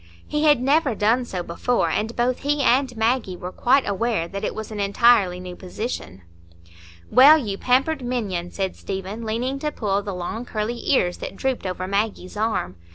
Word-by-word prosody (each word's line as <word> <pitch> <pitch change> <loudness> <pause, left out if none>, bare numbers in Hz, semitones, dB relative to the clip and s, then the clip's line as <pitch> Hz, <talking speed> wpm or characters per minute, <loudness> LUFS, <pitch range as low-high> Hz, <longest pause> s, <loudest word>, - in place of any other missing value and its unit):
He 300 +1 0
had 295 -4 +5
never 275 -2 +2
done 230 +5 +2
so 185 -6 -4
before, 235 +9 0
and 220 +2 -2
both 245 +1 0
he 290 0 0
and 255 -1 +2
Maggie 225 -4 0
were 180 +1 -6
quite 265 +7 +2
aware 200 -3 0
that 195 +2 -6
it - - -2
was 220 0 -6
an 210 - -5
entirely 200 -2 +3
new 180 -1 -8
position. 180 - -6 0.9
"Well, 285 +5 +8
you 215 -10 -3
pampered 270 +4 +2
minion!" 205 -8 -2
said 190 0 -3
Stephen, 195 +3 -5
leaning 245 +5 -2
to 300 +1 -2
pull 205 -6 -1
the 200 -2 -5
long 180 +6 -4
curly 235 0 -4
ears 180 -9 +2
that - - -6
drooped 260 -3 -2
over 185 0 -4
Maggie's 200 -2 -2
arm. 210 - -1
220 Hz, 180 wpm, -23 LUFS, 190-255 Hz, 0.9 s, Well